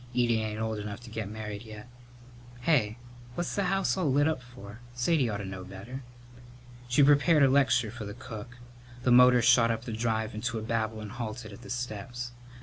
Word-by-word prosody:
Edie 120 Hz, -2 st, +2 dB
ain't 110 Hz, 0 st, -3 dB
old 110 Hz, -1 st, -2 dB
enough 105 Hz, 0 st, -5 dB
to 120 Hz, -2 st, -12 dB
get 110 Hz, -2 st, -4 dB
married 105 Hz, -1 st, -6 dB
yet. 110 Hz, 0 st, -10 dB, 0.7 s
Hey, 125 Hz, -7 st, +2 dB, 0.4 s
what's 175 Hz, -, -2 dB
the 200 Hz, -, +1 dB
house 195 Hz, +1 st, +1 dB
all 175 Hz, -7 st, +1 dB
lit 145 Hz, +3 st, +3 dB
up 155 Hz, -5 st, -1 dB
for? 120 Hz, -4 st, -12 dB, 0.2 s
Sadie 125 Hz, +1 st, +2 dB
ought 105 Hz, -, -2 dB
to 100 Hz, -, -5 dB
know 95 Hz, -1 st, -6 dB
better." 100 Hz, +8 st, -8 dB, 0.9 s
She 125 Hz, +4 st, +4 dB
prepared 145 Hz, +2 st, +5 dB
a -, -, +7 dB
lecture 130 Hz, -4 st, +3 dB
for 115 Hz, -2 st, -7 dB
the 100 Hz, 0 st, -7 dB
cook. 120 Hz, -1 st, -9 dB, 0.5 s
The 125 Hz, -, +3 dB
motor 125 Hz, 0 st, +7 dB
shot 120 Hz, 0 st, +6 dB
up 115 Hz, 0 st, -1 dB
the 115 Hz, -, -4 dB
drive 110 Hz, 0 st, -1 dB
into 115 Hz, +2 st, -3 dB
a 110 Hz, -, -4 dB
babble 110 Hz, -1 st, -2 dB
and 105 Hz, -2 st, -7 dB
halted 115 Hz, -2 st, -6 dB
at 100 Hz, -, -12 dB
the 125 Hz, -, -11 dB
steps. 120 Hz, 0 st, -4 dB
115 Hz, 200 wpm, -29 LUFS, 110-125 Hz, 0.9 s, a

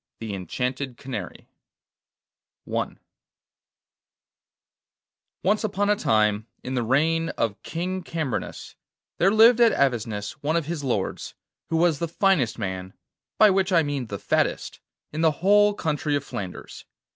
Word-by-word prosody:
THE 110 Hz, -2 st, -5 dB
ENCHANTED 125 Hz, -, -3 dB
CANARY 130 Hz, -2 st, -7 dB, 1.2 s
I -, -, -1 dB, 2.6 s
Once 205 Hz, +4 st, +2 dB
upon 205 Hz, -1 st, +1 dB
a -, -, +4 dB
time, 110 Hz, -, +1 dB, 0.2 s
in 130 Hz, -, -4 dB
the 125 Hz, -, 0 dB
reign 160 Hz, +7 st, +1 dB
of 110 Hz, -3 st, -1 dB
King 185 Hz, +3 st, -3 dB
Cambrinus, 160 Hz, -7 st, -4 dB, 0.4 s
there 185 Hz, -, +5 dB
lived 225 Hz, +3 st, +6 dB
at 230 Hz, -1 st, +6 dB
Avesnes 115 Hz, -6 st, 0 dB
one 155 Hz, +3 st, 0 dB
of 165 Hz, -3 st, +1 dB
his 160 Hz, -2 st, -4 dB
lords, 120 Hz, -8 st, -2 dB, 0.3 s
who 165 Hz, -, +1 dB
was 165 Hz, -3 st, +2 dB
the 170 Hz, -, -1 dB
finest 165 Hz, -, +1 dB
man—by 95 Hz, -, -1 dB
which 190 Hz, 0 st, +1 dB
I 170 Hz, -3 st, +4 dB
mean 140 Hz, -4 st, -3 dB
the 100 Hz, -, -5 dB
fattest—in 155 Hz, -, -3 dB
the 165 Hz, -, +5 dB
whole 205 Hz, +1 st, +5 dB
country 150 Hz, -4 st, -1 dB
of 140 Hz, -, -1 dB
Flanders. 95 Hz, -9 st, -7 dB
150 Hz, 130 wpm, -25 LUFS, 115-185 Hz, 2.6 s, lived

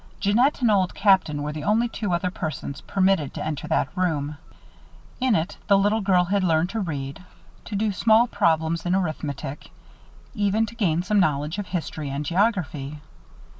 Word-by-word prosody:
Jeannette 240 Hz, +9 st, +2 dB
and 235 Hz, -3 st, +4 dB
Old 190 Hz, -3 st, +1 dB
Captain 185 Hz, -8 st, +3 dB
were 150 Hz, 0 st, -3 dB
the 150 Hz, -1 st, -6 dB
only 220 Hz, +6 st, +2 dB
two 220 Hz, -4 st, -4 dB
other 180 Hz, +1 st, 0 dB
persons 155 Hz, -5 st, -5 dB
permitted 190 Hz, -7 st, +1 dB
to -, -, -4 dB
enter 155 Hz, -3 st, -4 dB
that 145 Hz, -, 0 dB
room. 155 Hz, -5 st, -1 dB, 0.8 s
In 255 Hz, -3 st, +2 dB
it 165 Hz, +2 st, -2 dB
the 200 Hz, -, +5 dB
little 205 Hz, +3 st, +2 dB
girl 185 Hz, -3 st, +3 dB
had 195 Hz, +2 st, 0 dB
learned 165 Hz, +1 st, +2 dB
to 225 Hz, -, -2 dB
read, 145 Hz, -5 st, -4 dB, 0.4 s
to 205 Hz, -, -5 dB
do 210 Hz, +1 st, +1 dB
small 220 Hz, +3 st, +4 dB
problems 165 Hz, -6 st, +1 dB
in 180 Hz, +1 st, +1 dB
arithmetic, 150 Hz, -6 st, -4 dB, 0.6 s
even 210 Hz, 0 st, +1 dB
to 225 Hz, -, -10 dB
gain 175 Hz, -7 st, +1 dB
some 205 Hz, +2 st, +2 dB
knowledge 150 Hz, +1 st, 0 dB
of 205 Hz, -, -4 dB
history 160 Hz, -4 st, -4 dB
and 140 Hz, +2 st, -3 dB
geography. 160 Hz, -, -1 dB
180 Hz, 170 wpm, -24 LUFS, 155-205 Hz, 0.8 s, the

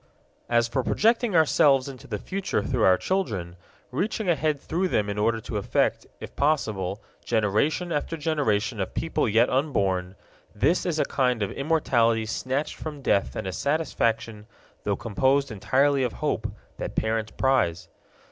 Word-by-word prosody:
As 120 Hz, -1 st, +3 dB
for 120 Hz, +3 st, -1 dB
projecting 225 Hz, -, +2 dB
ourselves 145 Hz, -4 st, +4 dB
into 130 Hz, -4 st, -10 dB
the 105 Hz, -, -3 dB
future 190 Hz, -, -2 dB
through 125 Hz, -4 st, -1 dB
our 95 Hz, -1 st, +5 dB
children, 100 Hz, -, -2 dB, 0.4 s
reaching 205 Hz, -, -2 dB
ahead 155 Hz, -3 st, +1 dB
through 175 Hz, +6 st, -1 dB
them 105 Hz, -, 0 dB
in 105 Hz, -, -4 dB
order 115 Hz, +2 st, +1 dB
to 110 Hz, -, -4 dB
affect, 100 Hz, -, 0 dB
if -, -, -9 dB
possible, 110 Hz, -10 st, 0 dB, 0.2 s
generation 120 Hz, -, +1 dB
after 165 Hz, +2 st, -2 dB
generation 120 Hz, -8 st, 0 dB
of 95 Hz, -, -3 dB
people 160 Hz, -7 st, 0 dB
yet 115 Hz, +3 st, +4 dB
unborn 100 Hz, -10 st, 0 dB, 0.4 s
this 150 Hz, -, +2 dB
is 165 Hz, -3 st, 0 dB
a -, -, +2 dB
kind 125 Hz, -5 st, +1 dB
of 100 Hz, -, -2 dB
immortality 120 Hz, -7 st, +1 dB
snatched 130 Hz, +6 st, -2 dB
from 150 Hz, -3 st, -7 dB
death 100 Hz, -, +1 dB
and -, -, -4 dB
a 95 Hz, -, -3 dB
satisfaction, 115 Hz, -, -1 dB, 0.4 s
though -, -, +1 dB
composed 130 Hz, +4 st, +1 dB
entirely 135 Hz, +7 st, +2 dB
of 125 Hz, -2 st, 0 dB
hope, -, -, -2 dB, 0.3 s
that -, -, -5 dB
parents 110 Hz, 0 st, -1 dB
prize. 110 Hz, -11 st, +1 dB
130 Hz, 155 wpm, -25 LUFS, 105-150 Hz, 0.4 s, our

